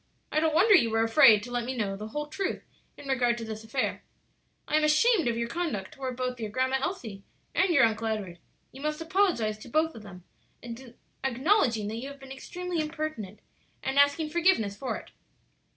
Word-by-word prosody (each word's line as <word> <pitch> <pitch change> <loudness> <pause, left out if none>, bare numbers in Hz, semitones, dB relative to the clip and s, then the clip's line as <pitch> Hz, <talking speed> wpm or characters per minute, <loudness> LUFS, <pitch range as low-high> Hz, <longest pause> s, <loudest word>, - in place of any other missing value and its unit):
I 305 - +2
don't 315 -1 +1
wonder 405 +6 +6
you 235 -12 +5
were 225 0 +2
afraid 225 -3 +6
to 245 - -8
let 245 -1 -1
me 255 +2 -4
know 200 -3 -1
the 210 +2 -7
whole 295 +7 -4
truth 375 +6 -3 0.3
in 280 - -11
regard 245 -3 +2
to 230 - -5
this 220 0 -6
affair. 240 +4 -2 0.6
I - - 0
am 310 - +3
ashamed 315 - +4
of 230 -1 0
your 235 0 -1
conduct 235 - -3
toward 260 -2 -5
both 250 -1 -3
your 220 -2 -3
Grandma 260 +4 0
Elsie 235 - -4 0.3
and 380 - +3
your 280 -6 +5
Uncle 225 0 +1
Edward. 200 -6 -3 0.3
You 265 - -12
must 305 +1 -2
apologize 325 - +1
to 245 - -11
both 320 +5 +1
of 225 - -10
them, 190 -4 -12 1.0
acknowledging 260 - +2
that 220 - -4
you 250 +4 -5
have 280 0 -11
been 270 0 -12
extremely 355 +6 -5
impertinent, 305 - -5 0.4
and 270 +1 +1
asking 285 +2 +3
forgiveness 330 - +2
for 255 +5 -3
it." - - -13
260 Hz, 200 wpm, -28 LUFS, 225-310 Hz, 1.0 s, wonder